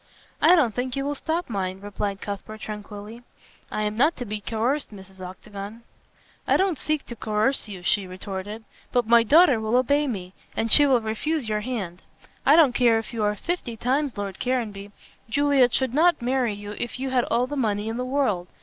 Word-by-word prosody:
"I 360 - +7
don't 260 -10 +2
think 250 +3 -3
you 275 0 -2
will 290 - -1
stop 325 +4 -3
mine," 190 -4 -3
replied 200 -1 -4
Cuthbert 210 +2 -7
tranquilly, 210 +2 -8 0.5
"I 215 - -2
am 210 0 -2
not 290 +8 +2
to 245 - -5
be 210 -1 -5
coerced, 240 +7 -1
Mrs. 190 -2 -13
Octagon." 200 +4 -9 0.6
"I - - +4
don't 380 -6 0
seek 305 -1 -1
to 235 - -8
coerce 220 +4 0
you," 190 -4 -9
she 195 +1 +1
retorted, 190 +3 -6 0.3
"but 245 -2 +2
my 235 +1 +6
daughter 285 +1 +5
will 220 +2 0
obey 285 +4 +2
me, 190 -7 -5 0.2
and 225 0 0
she 290 -1 +9
will 255 -3 +3
refuse 235 +6 -2
your 210 -1 -1
hand. 205 -7 -5 0.5
I 285 - +8
don't 310 -6 +6
care 240 -2 +4
if 225 +1 -5
you 225 -2 -2
are 210 0 +1
fifty 245 - -4
times 265 +3 -1
Lord 200 -2 -5
Caranby. 215 -6 -2 0.4
Juliet 280 -1 +3
should 260 -1 +1
not 330 +3 +4
marry 245 -3 0
you 205 0 -8
if 240 +1 -4
you 265 0 -3
had 250 -2 +2
all 235 +2 +1
the 290 +3 -5
money 215 -5 -1
in 225 +1 -3
the 250 - -2
world. 255 -9 0
230 Hz, 200 wpm, -24 LUFS, 205-265 Hz, 0.6 s, she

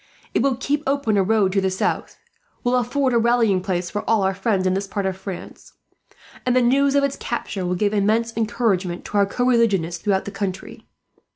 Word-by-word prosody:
It - - +2
will 270 0 +2
keep 285 +4 -1
open 275 -6 +1
a 200 - +4
road 200 -1 +2
to 195 +1 +1
the 190 - +1
south; 185 - -2 0.5
will 245 +1 +2
afford 255 +2 +1
a 235 - +4
rallying 230 -5 +2
place 180 -1 -2
for 210 - -2
all 225 -3 +3
our 190 0 +1
friends, 190 -1 0
in 185 - +2
this 195 +1 -2
part 200 0 -3
of 190 -1 -1
France; 190 -1 -9 0.7
and 250 0 +1
the 255 - +5
news 275 +3 +3
of 280 - +3
its 280 -1 -1
capture 200 -5 -4
will 180 - 0
give 205 +3 0
immense 220 +3 +1
encouragement 205 -5 -1
to 210 - -3
our 200 - +3
co 245 +5 -1
religionists 195 -9 +2
throughout 195 -2 0
the 205 - -5
country. 195 -2 -5
210 Hz, 210 wpm, -22 LUFS, 190-245 Hz, 0.7 s, the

